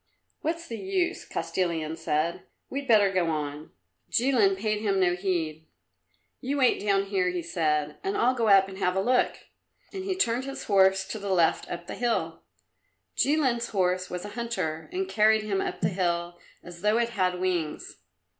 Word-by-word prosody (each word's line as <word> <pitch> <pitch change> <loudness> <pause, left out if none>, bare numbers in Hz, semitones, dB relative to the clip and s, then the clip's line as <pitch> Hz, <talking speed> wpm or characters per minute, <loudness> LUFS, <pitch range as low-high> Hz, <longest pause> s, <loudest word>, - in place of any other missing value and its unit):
"What's 335 +2 -3
the 230 - -6
use?" 375 -2 -1
Kostilin 165 -4 -2
said. 160 +1 -1 0.3
"We'd 275 0 -4
better 205 -4 +5
go 180 -2 +1
on." 150 -1 -4 0.4
Jilin 230 -6 +3
paid 210 +1 -1
no 190 -4 +2
heed 180 -4 -1
to 155 - -17
him. 160 - -33 0.7
"You 275 +3 -2
wait 255 -3 +3
down 200 -1 +2
here," 190 -2 0
he 180 -1 -3
said, 150 -3 -1
"and 390 +1 -1
I'll 255 - +4
just 255 - -6
go 230 - +2
up 195 -2 +6
and 190 0 -9
have 180 -1 +1
a - - +2
look." 250 +6 +2 0.6
And 380 -1 -5
he 380 -1 -2
turned 250 -7 +1
his 275 0 -6
horse 190 -1 +4
to 215 +3 -6
the 200 0 -5
left 175 -4 +2
up 175 0 -5
the - - -6
hill. 240 -1 -1 0.7
Jilin's 260 -6 +1
horse 185 -2 0
was 180 +1 -5
a - - -6
hunter 205 - -3
and 375 +1 -2
carried 215 - +3
him 200 -2 -1
up - - -4
the 175 - +2
hill 175 -2 -1 0.2
as 175 -1 -11
though 210 +2 +3
it 235 0 +1
had 185 -5 0
wings. 175 -4 -2
195 Hz, 185 wpm, -27 LUFS, 175-235 Hz, 0.7 s, up